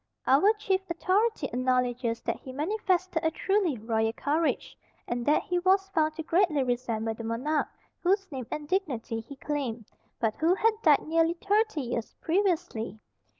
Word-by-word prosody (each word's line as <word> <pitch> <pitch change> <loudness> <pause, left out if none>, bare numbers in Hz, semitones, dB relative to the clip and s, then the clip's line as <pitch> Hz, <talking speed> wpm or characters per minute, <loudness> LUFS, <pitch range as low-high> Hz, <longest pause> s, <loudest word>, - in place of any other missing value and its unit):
Our 300 +11 +5
chief 395 -3 0
authority 375 +2 +1
acknowledges 250 -2 0
that - - -2
he 260 - -9
manifested 365 +3 0
a 320 - +3
truly 375 -3 0
royal 225 0 0
courage, 305 +6 -1 0.3
and 240 0 -2
that 300 - +4
he 355 0 0
was 385 +2 +3
found 315 -4 +1
to 320 - -4
greatly 330 -4 +2
resemble 235 -3 -1
the 230 - -8
monarch 250 +7 -1 0.3
whose 390 +2 +2
name 260 -4 -5
and 300 -1 -5
dignity 275 - -1
he 230 +5 -10
claimed, 265 -6 -3 0.3
but 220 -2 +1
who 330 +4 +3
had 445 +3 +3
died 300 -7 +4
nearly 330 +1 +2
thirty 410 -2 +1
years 235 -3 -4
previously. 320 - 0
305 Hz, 155 wpm, -28 LUFS, 245-370 Hz, 0.3 s, Our